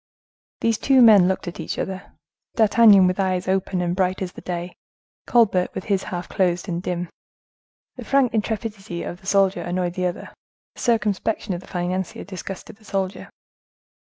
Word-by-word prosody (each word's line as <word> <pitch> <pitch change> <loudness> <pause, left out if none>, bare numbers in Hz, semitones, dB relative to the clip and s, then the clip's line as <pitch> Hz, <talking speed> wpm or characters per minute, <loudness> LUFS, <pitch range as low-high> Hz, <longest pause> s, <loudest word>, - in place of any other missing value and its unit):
These 230 -1 +1
two 270 -1 +4
men 205 -6 +7
looked 190 -1 -2
at 175 - -6
each - - -4
other—D'Artagnan, 205 +2 +2
with 185 +1 0
eyes 185 -1 0
open 190 -1 0
and 175 0 -1
bright 185 0 0
as 180 - -5
the - - -11
day—Colbert, 180 +3 -1
with - - -4
his 195 -3 -1
half 175 -1 -5
closed, 180 -2 0
and 175 -1 -3
dim. 180 -1 -3 0.9
The - - -8
frank 275 -4 +2
intrepidity 215 -4 -3
of 175 - -7
the 190 - -14
financier 195 -1 +2
annoyed 175 0 -2
the 180 0 -1
other; 175 - -6 0.4
the - - -11
circumspection 215 -2 0
of 175 - -5
the - - -16
financier 180 0 -3
disgusted 195 +1 -8
the 220 - -23
soldier. 195 -1 -3
190 Hz, 160 wpm, -22 LUFS, 180-210 Hz, 0.9 s, men